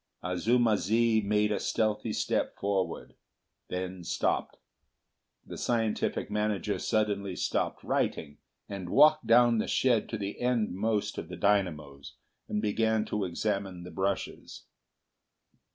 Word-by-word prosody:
Azuma 110 +5 +2
zi 110 +2 +2
made 105 +1 +2
a - - 0
stealthy 110 0 0
step - - -1
forward; 100 -2 -2 0.5
then 90 0 -5
stopped. - - -1 0.9
The - - -8
scientific 115 -3 -1
manager 105 -1 -1
suddenly 100 -4 0
stopped - - -1
writing, 75 - -2 0.3
and 95 -3 -6
walked 150 - +5
down 120 0 +5
the - - -1
shed 120 -5 +2
to 110 - -3
the 100 -1 -5
endmost 110 -3 0
of - - -7
the 90 - -7
dynamos, 80 -8 -1 0.3
and 105 +1 -2
began 110 +1 +1
to 105 -2 -2
examine 95 0 -2
the 90 - -9
brushes. 95 0 -3
105 Hz, 120 wpm, -29 LUFS, 95-110 Hz, 0.9 s, walked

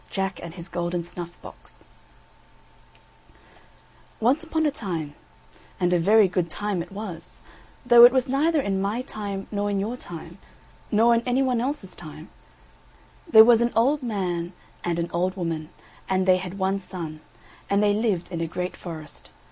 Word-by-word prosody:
JACK 190 -1 -3
AND 170 0 -8
HIS 170 -1 -8
GOLDEN 175 0 -2
SNUFF 175 0 -9
BOX - - -14 2.4
Once 260 +8 +2
upon 320 -1 -1
a 300 - +2
time, 170 - -5 0.7
and 180 -1 +2
a 175 - +3
very 205 +4 +5
good 180 -1 -1
time 205 0 -2
it 175 - -9
was, 195 -5 -8 0.5
though 240 -1 +8
it 240 - +10
was 260 +1 +1
neither 300 +5 +2
in 195 -7 -1
my 210 +6 -1
time 200 -4 -5
nor 205 -1 -1
in 200 -1 0
your 220 +5 -2
time 175 -4 -10 0.5
nor 230 +2 +5
in 230 - +2
any 255 +2 +2
one 250 -3 +1
else's 255 -7 -4
time, 155 0 -11 1.0
there 220 -7 +9
was 235 -1 +6
an 235 0 +2
old 275 +6 +3
man 185 -7 -2 0.3
and 170 -1 -1
an 170 0 -2
old 180 +2 0
woman, 165 -3 -3 0.4
and 190 0 +1
they 185 -1 +5
had 185 +1 -6
one 190 0 0
son, 165 -5 -7 0.5
and 200 +1 +2
they 205 -1 +4
lived 205 -5 -1
in 170 -2 -3
a 165 - -1
great 180 +3 -4
forest. 160 -3 -9
195 Hz, 170 wpm, -25 LUFS, 175-230 Hz, 2.4 s, it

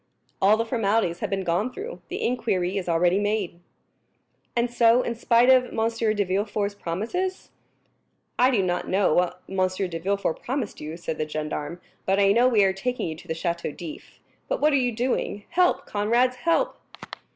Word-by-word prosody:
"All 205 +3 +5
the 230 - 0
formalities 215 -6 0
have - - -3
been 195 -1 -1
gone 185 +8 0
through; 440 - -7
the - - -3
inquiry 195 -7 0
is 185 -3 -2
already 175 +3 +3
made." 205 -4 -1 1.0
"And 235 0 +1
so, 235 +1 +5
in 235 - -2
spite 235 +2 +4
of 255 -1 +5
M. 225 -2 0
de 205 - +2
Villefort's 200 +2 -1
promises?" 225 - -3 0.9
"I 250 - +6
do 225 -7 +2
not 180 -1 -1
know 190 -4 +2
what 180 +1 0
M. 190 - -6
de 185 -2 -3
Villefort 195 -1 -1
promised 255 -4 -3
you," 155 +2 -6
said 160 -2 -5
the 155 - -2
gendarme, 155 +2 -4 0.3
"but 195 +1 +3
I 200 0 +5
know 240 +4 +5
we 220 -5 +4
are 190 -1 +3
taking 245 0 -2
you 160 - -5
to 180 - -14
the 160 - -2
Château 170 -2 -3
d'If. 165 -3 -9 0.3
But - - -1
what 305 0 +3
are - - +5
you 250 -3 +2
doing? 230 -3 -2
Help, 360 0 +2
comrades, 240 +5 +1
help!" 340 - 0
205 Hz, 185 wpm, -25 LUFS, 180-240 Hz, 1.0 s, I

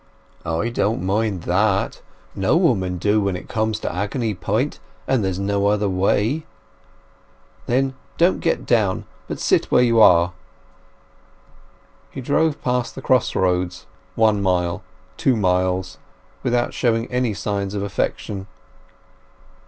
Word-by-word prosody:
"I 80 +8 0
don't 110 -5 -1
mind 100 -1 0
that; 95 +2 +1 0.3
no - - +2
woman 90 -1 +1
do 105 +4 +2
when 100 -2 0
it 90 - -8
comes 110 -1 -1
to - - -3
agony 105 +4 -1
point, 110 +9 -2 0.3
and 130 -5 +2
there's 95 -2 -1
no 100 +1 0
other 105 0 +2
way!" 105 +10 +1 1.2
"Then 135 +2 +1 0.2
don't 175 +2 +3
get 165 - -1
down, 105 -6 +1 0.2
but - - -5
sit - - +2
where - - +3
you 115 -2 +3
are." 85 -2 +6 1.8
He - - -8
drove 145 +4 0
past 125 -1 -1
the 135 - -8
cross 130 -3 +2
roads, 90 -1 0 0.3
one 110 -2 +3
mile, 90 0 0 0.4
two 130 - +2
miles, 90 -2 0 0.4
without 120 -2 0
showing 115 -2 +1
any 125 -4 0
signs 100 -1 -3
of 100 - -2
affection. 100 0 -3
105 Hz, 130 wpm, -21 LUFS, 95-120 Hz, 1.8 s, are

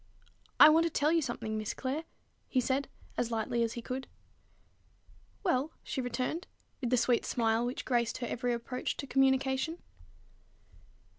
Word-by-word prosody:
"I - - +12
want 325 +2 +5
to - - +2
tell 300 -1 +2
you 335 0 +3
something, 220 -5 -3
Miss 215 - -3
Clare," 275 +5 -3 0.4
he 260 - +2
said 265 +2 0 0.3
as 235 - 0
lightly 230 +1 -1
as 230 -1 +1
he 235 - -6
could. 260 +2 -4 1.4
"Well?" 310 -4 +1
she 265 - -3
returned, 255 +7 -2 0.3
with 245 - -2
the 250 - +3
sweet 240 0 +3
smile 225 -1 +1
which 250 - -4
graced 235 -2 +1
her 245 - -3
every 245 +1 -1
approach 240 +2 -3
to - - -4
communication. 265 +3 +2
255 Hz, 155 wpm, -31 LUFS, 235-275 Hz, 1.4 s, I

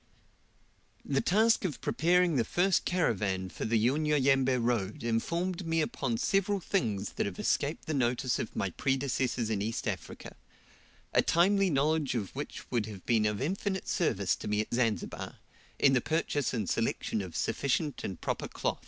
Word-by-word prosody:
The 135 -1 +1
task 220 +5 +3
of 170 -8 -2
preparing 175 0 +2
the 120 - +3
first 180 - +1
caravan 100 - 0
for - - -5
the 115 +1 +2
Unyanyembe 135 -2 +2
road 115 -4 -1
informed 170 +11 -1
me 165 0 +1
upon 135 -6 -1
several 195 - +1
things 110 - -1
that - - -2
have 95 - -6
escaped 145 +2 -1
the 155 - -2
notice 125 -1 +1
of 110 - -5
my 95 - -1
predecessors 130 -2 -1
in 100 -2 0
East 110 +2 -2
Africa, - - -5 0.8
a - - +5
timely 195 +3 +3
knowledge 150 -1 +1
of 105 -6 -3
which - - -7
would 115 -3 0
have 100 -4 -9
been 110 -3 +3
of 105 -1 -2
infinite 190 +4 -2
service 100 - +1
to - - -7
me 105 0 +1
at 110 - -6
Zanzibar, 115 -3 -1 0.4
in 135 - +4
the 125 - +3
purchase 155 -2 0
and 110 -6 -2
selection 105 - -1
of 90 -4 -8
sufficient 140 +1 -1
and 95 -4 -5
proper - - -3
cloth. - - -2
135 Hz, 165 wpm, -30 LUFS, 110-165 Hz, 0.8 s, a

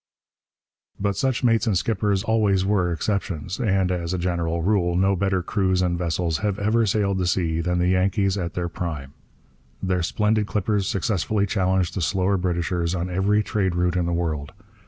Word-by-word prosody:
But 100 0 0
such 130 0 0
mates 115 -1 +3
and 100 -4 +2
skippers 100 0 0
always 105 -4 +2
were 95 -3 +1
exceptions; 90 -1 -2
and, 95 -5 +1
as 90 0 -2
a - - -2
general 85 -2 -1
rule, 90 -3 +1
no 95 +2 +3
better 95 -1 0
crews 95 -1 +1
and 90 -1 +1
vessels 85 -1 -1
have 105 -3 -1
ever 110 +2 +2
sailed 100 -1 +1
the 90 - 0
sea 85 -2 0
than 90 +1 0
the 90 +1 +2
Yankees 95 +1 +2
at 85 -4 -4
their 90 -1 -1
prime. 75 -5 -5 0.7
Their 90 -1 0
splendid 105 +4 +1
clippers 105 -2 0
successfully 100 +1 0
challenged 95 -3 0
the 95 - -3
slower 95 +5 +1
Britishers 85 -1 -1
on 90 +1 -3
every 100 +4 +2
trade 95 -5 -1
route 90 0 +1
in 90 -1 0
the - - -1
world. 80 -4 -2
95 Hz, 180 wpm, -23 LUFS, 85-100 Hz, 0.7 s, mates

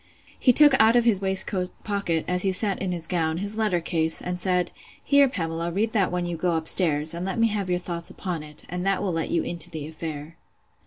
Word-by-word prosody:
He 255 - +4
took 290 +3 +6
out 220 +2 +4
of 240 - +4
his 220 -5 +2
waistcoat 190 -1 +1
pocket, 200 -6 -2
as 180 0 0
he 195 - +4
sat 195 +1 -1
in 190 -1 -2
his 170 -2 -3
gown, 165 -2 -1
his 200 +3 -4
letter 215 -5 0
case, 160 -1 +1
and 180 0 -5
said, 180 -1 +1 0.3
Here, 280 -1 +3
Pamela, 165 -5 -4
read 215 +5 -1
that 200 -6 0
when 180 0 -3
you 175 -1 -4
go 175 +1 -1
up 160 -1 -3
stairs, 155 -3 +5
and 170 +1 -6
let 190 +3 -4
me 230 0 +2
have 205 -3 -4
your 180 - 0
thoughts 170 -1 -6
upon 180 -4 -5
it; 150 0 -7
and 180 +1 -5
that 195 +1 -1
will 190 -3 -2
let 165 -1 -3
you 170 - -1
into 170 -2 +2
the 155 -2 -7
affair. 160 0 -8
180 Hz, 240 wpm, -24 LUFS, 165-200 Hz, 0.3 s, took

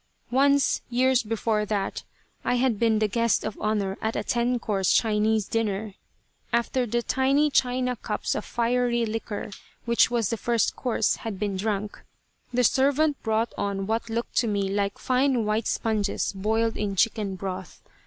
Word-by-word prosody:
Once, 280 +2 +3
years 255 +1 +3
before 220 -1 -1
that, 205 -2 -2 0.4
I - - +1
had 245 -4 +1
been 225 -2 +3
the 215 0 +2
guest 230 +2 +1
of 215 - -4
honor 205 -3 -1
at 220 +1 -1
a - - -1
ten 245 +1 +1
course 200 -5 0
Chinese 215 -1 +2
dinner. 215 -2 -2 0.6
After 240 +1 +1
the 235 +2 -1
tiny 275 +4 +2
China 250 -1 +1
cups - - -3
of - - -3
fiery 240 0 0
liquor, 220 -1 -4 0.3
which 235 -1 +4
was 230 -4 0
the 230 - -1
first 235 0 +1
course, 245 -3 0
had 220 -4 -5
been 200 0 -2
drunk, 205 +1 -3 0.5
the 250 0 +2
servant 285 +4 +2
brought 220 +1 0
on 195 -1 -2
what 225 +2 -2
looked 230 +1 -3
to 235 - +3
me 200 -2 0
like 200 0 -1
fine 255 -2 +1
white 215 +1 0
sponges 215 -3 -1
boiled 220 +3 0
in 205 -2 -2
chicken 205 -1 +1
broth. 185 -1 -6
225 Hz, 165 wpm, -26 LUFS, 210-245 Hz, 0.6 s, which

